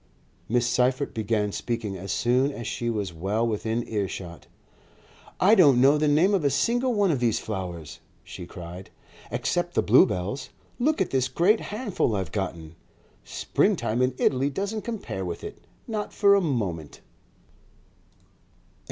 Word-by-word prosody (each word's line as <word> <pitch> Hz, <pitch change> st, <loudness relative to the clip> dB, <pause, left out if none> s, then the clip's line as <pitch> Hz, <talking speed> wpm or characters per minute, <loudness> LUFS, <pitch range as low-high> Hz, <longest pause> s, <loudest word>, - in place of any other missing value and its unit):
Miss 120 Hz, +1 st, +2 dB
Seyffert 125 Hz, +3 st, +1 dB
began 105 Hz, -1 st, 0 dB
speaking 115 Hz, -2 st, -3 dB
as 95 Hz, +1 st, -6 dB
soon 125 Hz, +6 st, +2 dB
as 120 Hz, -4 st, -7 dB
she 120 Hz, +1 st, -2 dB
was 105 Hz, -6 st, -2 dB
well 100 Hz, +7 st, -1 dB
within 115 Hz, +1 st, -2 dB
earshot. 95 Hz, -5 st, -4 dB, 0.9 s
"I 200 Hz, +4 st, +5 dB
don't 145 Hz, -, +6 dB
know 140 Hz, +4 st, +5 dB
the 150 Hz, -, +2 dB
name 160 Hz, +7 st, +4 dB
of 190 Hz, -5 st, +1 dB
a 140 Hz, -, +3 dB
single 240 Hz, -, +1 dB
one 200 Hz, -3 st, +3 dB
of 140 Hz, -, 0 dB
these 120 Hz, -3 st, +1 dB
flowers," 90 Hz, -7 st, -6 dB, 0.2 s
she 85 Hz, -, -9 dB
cried, 90 Hz, +1 st, -9 dB, 0.4 s
"except -, -, -1 dB
the -, -, +3 dB
bluebells. 95 Hz, +10 st, +2 dB, 0.3 s
Look 300 Hz, +2 st, +1 dB
at 190 Hz, -, 0 dB
this 130 Hz, -1 st, +1 dB
great 180 Hz, -, +3 dB
handful 205 Hz, -, -2 dB
I've 95 Hz, -5 st, -3 dB
gotten! 85 Hz, -5 st, -4 dB, 0.5 s
Springtime 115 Hz, +3 st, 0 dB
in 125 Hz, 0 st, +1 dB
Italy 135 Hz, +1 st, +2 dB
doesn't 200 Hz, +9 st, -3 dB
compare 215 Hz, -, -5 dB
with 85 Hz, -2 st, -5 dB
it, -, -, -9 dB, 0.2 s
not 215 Hz, -3 st, -4 dB
for 200 Hz, -2 st, +5 dB
a 200 Hz, -, +4 dB
moment." 100 Hz, -, -3 dB
120 Hz, 150 wpm, -26 LUFS, -, 0.9 s, don't